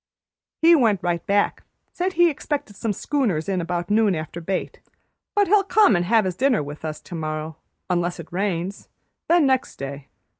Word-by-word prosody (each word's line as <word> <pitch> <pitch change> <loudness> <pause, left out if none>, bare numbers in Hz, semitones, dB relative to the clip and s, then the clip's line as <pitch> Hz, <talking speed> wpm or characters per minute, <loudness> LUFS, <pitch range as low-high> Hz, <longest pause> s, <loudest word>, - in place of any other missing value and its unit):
"He 335 +1 +8
went 220 - +2
right 175 -1 -1
back; 200 0 +1 0.3
said 370 +1 -1
he 345 0 +5
expected 285 -7 -4
some 220 +2 -2
schooners 205 - -1
in 190 -2 0
about 175 +2 -3
noon 210 -3 +3
after 160 +2 -6
bait, 185 +3 -3 0.6
but 410 -1 +4
he'll 405 +1 +4
come 405 - +4
an' 175 - +2
have 220 +1 +3
his 185 - -1
dinner 255 - +2
with 145 +2 -9
us 155 -1 -4
tomorrow, 155 -2 -5 0.3
unless 175 -1 -1
it 165 0 -10
rains; 190 0 -2 0.4
then 340 -2 +4
next 260 -1 +1
day. 140 0 -7
190 Hz, 175 wpm, -23 LUFS, 170-260 Hz, 0.6 s, He